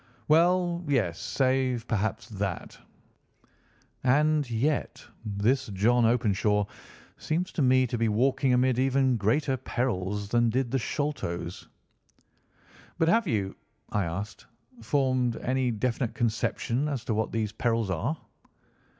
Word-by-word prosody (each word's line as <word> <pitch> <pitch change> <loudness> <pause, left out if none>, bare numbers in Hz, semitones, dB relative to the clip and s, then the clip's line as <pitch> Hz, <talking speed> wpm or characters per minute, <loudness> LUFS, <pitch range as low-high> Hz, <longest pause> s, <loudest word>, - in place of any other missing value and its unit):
"Well, 175 +2 +3
yes. 110 -12 0
Save, 130 -3 0
perhaps, 110 +1 -1
that. 100 -4 -4 1.3
And 150 +2 +3
yet 135 +6 -1 0.2
this 115 +6 0
John 115 +4 +3
Openshaw 105 -3 +2 0.5
seems 175 +4 -2
to 160 - -2
me 130 -1 +4
to 120 -1 -3
be 115 -1 +2
walking 130 +4 +2
amid 125 0 +3
even 130 -1 +2
greater 120 +6 +1
perils 105 -6 -2
than 120 +1 +3
did 125 +1 -1
the 135 - +1
Sholtos." 110 - -3 1.3
"But 165 - +2
have 225 0 +3
you," 100 -7 -1 0.4
I 105 -3 0
asked, 100 +6 -6 0.3
"formed 130 -1 +1
any 130 0 0
definite 120 +1 -1
conception 120 +3 -1
as 130 -5 -4
to 115 - -1
what 110 +1 -1
these 110 -2 -1
perils 115 -2 0
are?" 120 - -1
120 Hz, 125 wpm, -27 LUFS, 110-135 Hz, 1.3 s, me